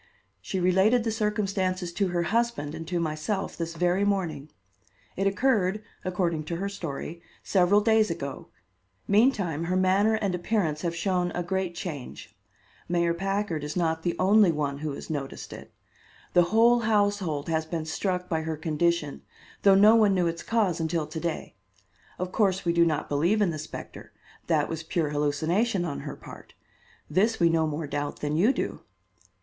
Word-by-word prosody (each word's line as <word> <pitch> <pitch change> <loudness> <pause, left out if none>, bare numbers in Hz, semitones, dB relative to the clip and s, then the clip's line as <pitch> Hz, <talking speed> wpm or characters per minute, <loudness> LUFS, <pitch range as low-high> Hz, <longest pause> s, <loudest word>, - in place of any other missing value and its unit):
She 190 - -3
related 190 +7 +3
the 225 - -1
circumstances 195 -5 -1
to 195 +2 0
her 175 -1 0
husband 225 -7 -1
and 165 0 -7
to 175 0 -1
myself 160 +5 -2
this 165 0 -4
very 180 +3 +1
morning. 175 -8 -1 0.7
It 195 +1 +1
occurred, 210 -2 +1 0.2
according 175 -4 -1
to 170 - -3
her 195 +4 -3
story, 170 -3 -6 0.2
several 195 +2 +3
days 220 -1 +3
ago; 140 -5 -5 0.6
meantime 200 - +2
her 180 +2 -1
manner 195 +4 +3
and 200 -4 -1
appearance 175 -4 -1
have 170 -2 -2
shown 180 0 0
a 175 - -2
great 185 0 -2
change. 150 -9 -7 0.5
Mayor 170 -1 +2
Packard 195 -3 -2
is 150 - -5
not 160 -2 0
the 170 0 -1
only 200 0 +5
one 145 -2 -2
who 155 0 -3
has 140 - -7
noticed 140 -3 -5
it. - - -11 0.6
The 175 -1 +5
whole 235 +4 +5
household 205 -9 0
has 160 -1 0
been 160 -1 -3
struck 180 +2 -2
by 160 -2 -1
her 160 -1 -3
condition, 160 -1 0 0.4
though 195 -1 +6
no 210 +3 +7
one 210 -4 +4
knew 180 -1 +2
its 170 0 -2
cause 210 -7 0
until 160 -1 -1
to 160 - -6
day. 170 -1 -4 0.6
Of 180 0 -4
course, 195 -3 +1
we 170 - +2
do 170 0 +4
not 155 -2 -1
believe 170 +9 +1
in 200 -5 +2
the 155 - -5
specter; 155 - -9 0.3
that - - +2
was 165 -1 -4
pure 160 -1 -1
hallucination 160 +8 0
on 145 -4 -4
her - - -6
part. - - -13 0.5
This 210 +8 +1
we 170 -1 +5
no 165 -1 +2
more 155 +1 -3
doubt 145 0 -4
than 150 0 -1
you 200 +10 +4
do." - - -3
175 Hz, 175 wpm, -27 LUFS, 160-200 Hz, 0.7 s, no